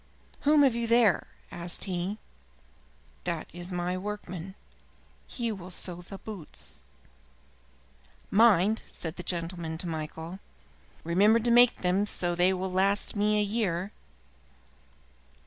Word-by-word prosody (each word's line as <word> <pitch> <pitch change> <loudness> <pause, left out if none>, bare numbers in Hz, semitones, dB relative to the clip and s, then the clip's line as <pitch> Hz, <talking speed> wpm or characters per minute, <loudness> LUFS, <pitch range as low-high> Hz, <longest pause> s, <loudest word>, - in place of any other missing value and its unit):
"Whom 295 0 +5
have 265 -4 +5
you 235 0 -2
there?" 230 -4 +4 0.2
asked 170 0 -4
he. 185 +2 -2 1.1
"That 170 -3 -2
is 175 +2 -7
my 180 0 -1
workman. 190 -2 -6 0.7
He 235 -2 -3
will 185 -3 -7
sew 175 -1 -6
the 195 +2 -9
boots." 195 -6 -10 1.5
"Mind," 215 -1 +5
said 165 -1 -5
the - - -4
gentleman 170 -2 -3
to 175 - -5
Michael, 160 +3 -5 0.6
"remember 200 +7 +4
to 235 +1 +1
make 240 0 +7
them 190 +3 +1
so 175 -3 0
that 175 - -3
they 180 +1 +5
will 190 0 -2
last 195 +3 +1
me 210 +1 +2
a - - +3
year." 200 -3 -1
185 Hz, 130 wpm, -29 LUFS, 175-210 Hz, 1.5 s, make